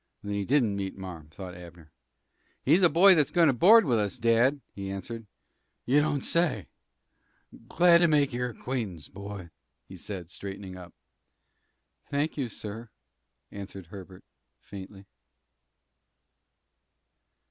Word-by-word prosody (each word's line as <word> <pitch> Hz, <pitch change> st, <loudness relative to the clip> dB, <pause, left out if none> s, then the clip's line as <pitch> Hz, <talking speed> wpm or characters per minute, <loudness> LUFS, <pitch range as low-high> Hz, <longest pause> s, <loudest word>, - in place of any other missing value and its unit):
"Then 100 Hz, 0 st, -4 dB
he 100 Hz, -1 st, -2 dB
didn't 120 Hz, -6 st, +2 dB
meet 95 Hz, -1 st, -4 dB
marm," 85 Hz, -5 st, -9 dB
thought 90 Hz, +3 st, -9 dB
Abner. 85 Hz, -3 st, -13 dB, 0.7 s
"He's 160 Hz, +8 st, +4 dB
a 175 Hz, -, +6 dB
boy 185 Hz, +4 st, +7 dB
that's 150 Hz, -6 st, +2 dB
goin' 170 Hz, -2 st, +4 dB
to -, -, +3 dB
board 210 Hz, -, +6 dB
with 120 Hz, -6 st, +2 dB
us, 105 Hz, -2 st, -2 dB
dad," 115 Hz, +5 st, +3 dB
he 100 Hz, -1 st, -6 dB
answered. 105 Hz, +4 st, -6 dB, 0.6 s
"You 140 Hz, +4 st, +4 dB
don't 145 Hz, -2 st, 0 dB
say! 160 Hz, -, +1 dB, 1.0 s
Glad 175 Hz, -1 st, +5 dB
to 170 Hz, -, +4 dB
make 145 Hz, -4 st, +2 dB
your 125 Hz, 0 st, -2 dB
acquaintance, 110 Hz, -, -5 dB
boy," 100 Hz, -3 st, -9 dB, 0.4 s
he 95 Hz, -, -11 dB
said, 90 Hz, -1 st, -7 dB
straightening 95 Hz, -1 st, -7 dB
up. 90 Hz, -2 st, -12 dB, 1.1 s
"Thank 145 Hz, +3 st, -1 dB
you, 135 Hz, -5 st, -3 dB
sir," 110 Hz, +2 st, -7 dB, 0.6 s
answered 100 Hz, -2 st, -9 dB
Herbert, 95 Hz, -1 st, -11 dB, 0.4 s
faintly. 95 Hz, 0 st, -11 dB
105 Hz, 130 wpm, -28 LUFS, 95-140 Hz, 1.1 s, boy